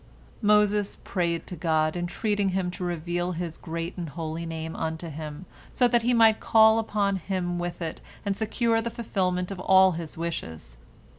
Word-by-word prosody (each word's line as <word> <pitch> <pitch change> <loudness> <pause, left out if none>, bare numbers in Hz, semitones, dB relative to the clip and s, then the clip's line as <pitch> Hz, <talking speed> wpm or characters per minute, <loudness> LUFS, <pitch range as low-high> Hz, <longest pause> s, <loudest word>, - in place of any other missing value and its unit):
" - - -27 0.2
Moses 210 -1 +1
prayed 170 -3 -1
to 180 - -6
God, 155 -1 +1
entreating 195 +3 0
Him 185 -1 -1
to 180 +1 -6
reveal 175 +1 -2
His 170 -1 -4
Great 165 +1 -5
and 170 -3 -4
Holy 165 +2 -5
Name 160 0 -5
unto 160 +1 -3
him, 155 +2 -7 0.3
so 250 - +3
that 240 0 +3
he 240 +2 +1
might 225 -2 +5
call 220 0 +5
upon 205 -3 0
Him 175 -1 -2
with 175 0 -4
it 160 - -5 0.2
and 200 -1 0
secure 225 +2 +1
the 235 - -3
fulfilment 185 -5 -1
of 195 - -5
all 190 0 +6
his 165 -2 -6
wishes. 80 - -5
180 Hz, 175 wpm, -26 LUFS, 165-205 Hz, 0.3 s, all